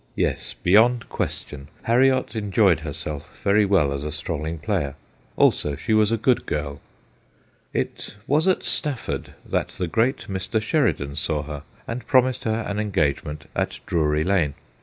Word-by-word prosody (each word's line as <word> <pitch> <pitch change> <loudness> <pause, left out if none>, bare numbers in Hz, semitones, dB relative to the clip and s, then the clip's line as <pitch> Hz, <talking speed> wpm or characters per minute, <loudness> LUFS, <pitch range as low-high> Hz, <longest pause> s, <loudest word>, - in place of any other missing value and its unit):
Yes, - - -1
beyond^ 115 +6 +5
question, 70 -1 -3 0.2
Harriot 130 +2 +3
enjoyed 100 -5 +3
herself 75 -2 -6
very 100 +1 +4
well 90 -8 +3
as 70 0 -4
a 75 - -3
strolling 80 +1 -3
player. 75 -3 -1 0.4
Also, 75 -1 +3
she 110 - -1
was 110 0 +4
a 115 - +2
good 125 +3 +1
girl. 70 -1 -3 0.9
It - - -3
was 150 +6 +2
at 185 - +2
Stafford 145 -7 -2
that - - 0
the 90 - -3
great 120 - +1
Mr. 95 +3 0
Sheridan 110 - 0
saw 75 -1 +1
her, 75 -1 -6 0.3
and 115 +1 -5
promised 130 -1 +3
her 110 0 0
an 100 +1 -2
engagement 75 -7 -1
at - - -1
Drury 75 -2 +1
Lane. 80 -6 +1
100 Hz, 150 wpm, -24 LUFS, 75-115 Hz, 0.9 s, beyond^